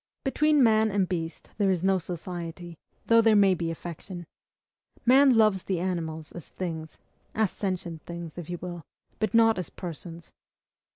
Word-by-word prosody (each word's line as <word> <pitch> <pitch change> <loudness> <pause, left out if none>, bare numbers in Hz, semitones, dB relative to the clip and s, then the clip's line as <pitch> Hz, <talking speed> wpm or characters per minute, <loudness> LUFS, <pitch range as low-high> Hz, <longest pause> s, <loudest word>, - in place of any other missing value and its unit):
Between 300 +1 +3
man 220 -1 +4
and 195 -2 +1
beast 165 -2 -5
there 200 -2 +3
is 185 -2 0
no 190 0 +3
society, 175 0 -6 0.3
though 230 0 +6
there 225 -1 +5
may 200 -2 +6
be 170 -2 -2
affection. 175 +2 -7 0.8
Man 260 0 +6
loves 215 -4 +4
the 185 -3 -1
animals 160 -4 -3
as 175 - -10
THINGS, 160 -4 -5 0.4
as 215 -3 +2
SENTIENT 180 -5 -4
THINGS, 170 -2 -7
if 170 - -8
you 175 - -3
will, 175 -1 -7 0.4
but 215 +1 0
not 225 -3 +5
as 180 - -4
PERSONS. 170 -1 -8
180 Hz, 160 wpm, -27 LUFS, 170-215 Hz, 0.8 s, though